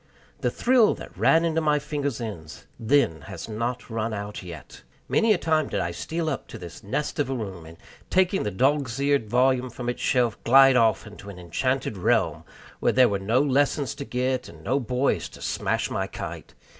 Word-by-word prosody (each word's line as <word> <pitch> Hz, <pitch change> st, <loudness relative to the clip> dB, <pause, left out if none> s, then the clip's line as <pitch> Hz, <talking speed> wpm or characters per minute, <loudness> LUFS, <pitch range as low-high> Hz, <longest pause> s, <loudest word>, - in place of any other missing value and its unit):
The -, -, +1 dB
thrill 245 Hz, -3 st, +3 dB
that -, -, -11 dB
ran 165 Hz, +1 st, +4 dB
into 160 Hz, -1 st, +1 dB
my 150 Hz, -1 st, +2 dB
fingers' 145 Hz, -3 st, -3 dB
ends 90 Hz, -10 st, -7 dB
then 115 Hz, -, +2 dB
has 95 Hz, -2 st, -7 dB
not 120 Hz, +3 st, -3 dB
run 110 Hz, -1 st, -2 dB
out 105 Hz, 0 st, -6 dB
yet. 90 Hz, -3 st, -10 dB, 0.3 s
Many 225 Hz, -1 st, +3 dB
a 210 Hz, -, +4 dB
time 155 Hz, -3 st, +1 dB
did 100 Hz, -, -2 dB
I 85 Hz, -1 st, -1 dB
steal 160 Hz, -, -3 dB
up 140 Hz, -, -3 dB
to -, -, -9 dB
this 90 Hz, -5 st, -10 dB
nest 145 Hz, +10 st, -3 dB
of 140 Hz, -3 st, 0 dB
a 135 Hz, -, -1 dB
room, 95 Hz, -8 st, -6 dB
and, 80 Hz, +1 st, -13 dB, 0.3 s
taking 185 Hz, +1 st, +2 dB
the 105 Hz, -, -1 dB
dog's 130 Hz, +4 st, +1 dB
eared 140 Hz, -6 st, +1 dB
volume 130 Hz, +1 st, +2 dB
from 120 Hz, +1 st, -5 dB
its 120 Hz, -, -4 dB
shelf, 120 Hz, -4 st, +1 dB
glide 135 Hz, +2 st, +7 dB
off 115 Hz, -5 st, +3 dB
into 105 Hz, -1 st, -11 dB
an 100 Hz, -, -9 dB
enchanted 130 Hz, +6 st, -2 dB
realm, 90 Hz, -, +1 dB, 0.3 s
where -, -, +2 dB
there 130 Hz, -1 st, +5 dB
were 100 Hz, -1 st, -1 dB
no 115 Hz, +8 st, +2 dB
lessons 140 Hz, 0 st, +1 dB
to -, -, -6 dB
get 130 Hz, 0 st, -2 dB
and -, -, -14 dB
no 135 Hz, +3 st, +1 dB
boys 125 Hz, +2 st, 0 dB
to -, -, -14 dB
smash -, -, -1 dB
my -, -, -1 dB
kite. -, -, -8 dB
125 Hz, 200 wpm, -25 LUFS, 105-140 Hz, 0.3 s, glide